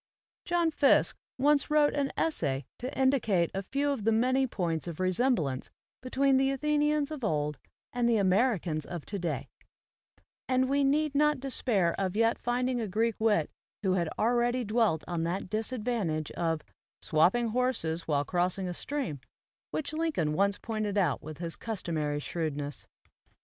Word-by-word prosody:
" - - -70
John 345 -2 +2
Fiske 285 -2 +4 0.2
once 285 +2 +3
wrote 300 -1 +4
an 280 -1 0
essay 145 - 0
to 255 +2 -4
indicate 230 -10 +2
a 195 - -2
few 280 +8 -1
of 270 -7 -3
the 225 - +3
many 255 +4 +2
points 170 -7 -2
of 170 -3 -5
resem 190 +8 +2
blance 135 - -3 0.3
between 265 +1 +2
the 270 0 +3
Athenians 295 +1 +1
of 300 -5 -6
old 150 -5 -1 0.3
and 245 -1 +1
the 230 - +3
Americans 190 - +2
of 175 -1 -7
today; 175 -6 -3 1.0
and 255 0 +3
we 280 +1 +2
need 295 +2 +2
not 300 0 +3
despair 230 -9 +1
of 190 -1 -1
yet 230 +1 +2
finding 245 0 0
a 220 - -2
Greek 225 +4 +1
wit 210 -8 +2 0.3
who 190 - +2
had 170 -3 0
already 240 +2 +2
dwelt 210 -7 +1
on 175 -2 -2
that 180 +2 -3
disadvantage 215 - -1
of 165 -2 -1 0.4
"swapping 190 +10 +3
horses 220 -9 -1
while 145 -2 +1
crossing 180 +2 0
a - - -2
stream/' 215 - -4 0.5
which 310 - -3
Lincoln 310 - 0
once 200 +4 +2
pointed 215 -2 -3
out 170 -9 +1
with 155 -1 -8
his 170 -1 -4
customary 160 -9 -2
shrewdness. 145 -3 -4
220 Hz, 160 wpm, -29 LUFS, 170-265 Hz, 1.0 s, Fiske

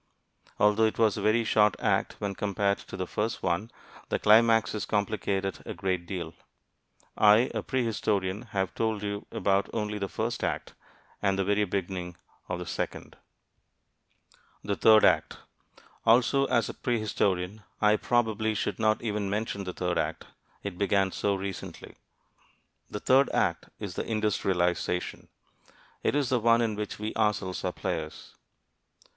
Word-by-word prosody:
Although 105 +2 +4
it 110 - -1
was 110 -3 +3
a - - -4
very 115 +2 +3
short 105 -2 +3
act - - 0
when 100 -1 -3
compared 100 0 0
to - - -9
the 95 - -2
first 105 +5 -3
one, 90 +5 0 0.4
the - - +1
climaxes 115 0 +4
complicate 100 -2 -1
it 95 - -4
a - - -6
great 90 -2 -2
deal. 85 -4 -5 0.8
I, 105 +3 +5
a - - -1
prehistorian, 110 -4 -1
have 95 -3 -2
told 110 -2 -1
you 100 0 -4
about 100 0 +1
only 105 -1 -2
the 100 -1 -3
first - - -3
act, - - -2 0.5
and 95 -1 +1
the 95 - +1
very 105 +2 +2
beginning 90 -2 -4 0.3
of 90 - -2
the 90 - -6
second. - - -5 1.5
THE 100 - -1
THIRD 110 +1 +6
ACT - - +2 0.7
Also, 130 +4 +4
as 115 -5 +1
a - - -5
prehistorian 105 -4 -1 0.2
I 105 0 +4
probably 110 -2 0
should - - -2
not 110 0 +2
even 105 -3 -2
mention 100 -1 -2
the 90 - -4
third 90 -1 -1
act - - -3 0.4
it 95 -3 -6
began 100 -1 +2
so 100 +1 0
recently. 95 -1 -7 0.9
The 105 - -5
third 135 +2 +4
act - - 0
is - - -5
The - - -4
Industrialization. 90 -4 0 0.7
It - - 0
is 145 -4 +1
the 125 - +2
one 115 +1 +4
in 110 -2 0
which 105 0 -4
we 105 +1 -4
ourselves 105 -4 0
are - - 0
players. 80 -1 -5
105 Hz, 150 wpm, -28 LUFS, 95-110 Hz, 1.5 s, THIRD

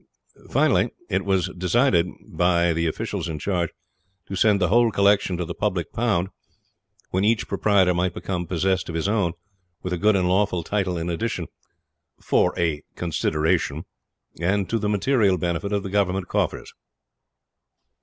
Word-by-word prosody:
Finally, - - +3 0.2
it - - +1
was 95 -2 +1
decided 90 0 +2 0.2
by 85 -1 +2
the 85 +1 0
officials 80 - -3
in 80 - -4
charge 85 0 -1 0.6
to 95 - -6
send 100 +1 +3
the 90 -3 +1
whole 120 +2 +4
collection 100 -2 +2
to 90 - -2
the - - -5
public 95 -6 -2
pound, 105 -6 0 0.8
when 95 +2 +1
each 110 +1 +2
proprietor 95 -4 +3
might 90 +1 0
become 90 0 -3
possessed 95 +1 0
of 85 - -5
his 80 +3 -1
own, 100 -5 +1 0.5
with 90 - -3
a 90 - -2
good 105 +2 +4
and 90 -2 +2
lawful 90 -2 +1
title 95 -1 -1
in 85 0 -3
addition 90 +1 -2 0.7
for - - +2
'a 80 -4 0
consideration' 80 -2 0 0.5
and 95 +3 +1
to 115 - +1
the 105 -1 -1
material 105 -2 +2
benefit 85 +4 -2
of 100 -1 0
the 95 - -5
Government 95 -2 0
coffers. - - -2
95 Hz, 155 wpm, -23 LUFS, 85-100 Hz, 0.8 s, whole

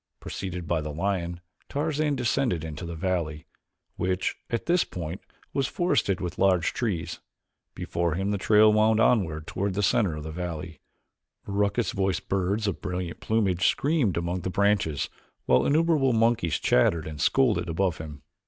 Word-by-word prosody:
Preceded 90 -3 -5
by 80 -1 +1
the 75 - -5
lion 85 +1 -2 0.3
Tarzan 150 0 0
descended 125 - 0
into 80 +2 -6
the 85 - -5
valley, 80 -3 -2 0.5
which, 90 0 -1
at 115 - -2
this 175 0 +3
point, 85 +1 -6 0.3
was 135 -1 +1
forested 140 - +1
with 90 0 -5
large 90 -4 +3
trees. 100 -9 -2 0.6
Before 85 -2 -1
him 95 +3 -1
the 100 - -1
trail 105 +1 +5
wound 110 +1 +4
onward 85 -10 +2
toward 95 +2 -2
the 105 - 0
center 100 -6 +2
of 75 - -6
the 80 - -6
valley. 85 -2 -5 0.7
Raucous 100 +2 0
voiced 95 -1 -1
birds 100 +3 0
of 100 - -2
brilliant 90 -2 -4
plumage 100 -5 +1
screamed 140 - +1
among 85 +2 -2
the 95 - -3
branches 100 -7 +1 0.4
while 65 - +3
innumerable 150 -4 +3
monkeys 115 -8 +2
chattered 80 +5 +2
and 75 -2 -6
scolded 105 -11 +2
above 90 +1 0
him. 75 -2 -8
95 Hz, 155 wpm, -26 LUFS, 85-110 Hz, 0.7 s, trail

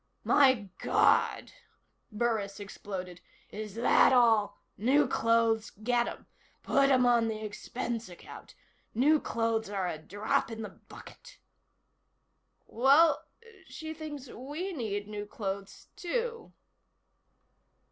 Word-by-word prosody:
"My 260 -8 +4
God," - - +2 0.6
Burris 210 -3 -1
exploded. 185 -3 -7 0.3
"Is 210 -1 -7
that 235 +3 +4
all? 225 -5 +3 0.2
New 265 +7 +3
clothes? 230 -1 +1
Get 240 +3 -1
'em. - - -8 0.4
Put 275 0 +3
'em 255 -2 +4
on 235 -2 +3
the 220 -1 -4
expense 230 +1 -5
account. 175 - -12 0.4
New 295 +6 +4
clothes 225 -4 -1
are 195 -3 -2
a 155 - -4
drop 205 +8 -1
in 225 -1 -6
the 210 - -6
bucket." - - -15 1.3
"Well 275 +7 +4 0.4
she 315 0 -7
thinks 295 -4 -8
we 295 +11 -6
need 205 -7 -4
new 210 -1 -6
clothes, 195 -2 -6
too." 460 +5 -3
230 Hz, 110 wpm, -30 LUFS, 205-270 Hz, 1.3 s, My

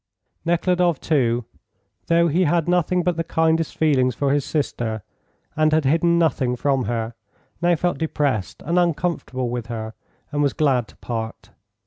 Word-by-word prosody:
Nekhludoff, 175 -1 +2
too, 120 -6 +1 0.6
though 170 0 +4
he 175 +4 +2
had 170 +1 +1
nothing 180 0 +2
but 175 -1 0
the 165 - 0
kindest 160 0 +1
feelings 130 -6 +2
for 140 -1 +1
his 145 -1 +1
sister, 115 -8 -2 0.5
and 155 0 +3
had 155 -2 +2
hidden 170 +4 +3
nothing 135 -6 +1
from 135 -1 0
her, 115 +1 -2 0.5
now 175 0 +3
felt 175 -3 -1
depressed 145 - -1
and 170 +4 +2
uncomfortable 160 -7 -1
with 120 -2 -4
her, 110 -2 -5 0.4
and 145 - 0
was 140 -2 +2
glad 135 -7 +1
to - - -18
part. 115 -2 -6
150 Hz, 155 wpm, -22 LUFS, 125-170 Hz, 0.6 s, though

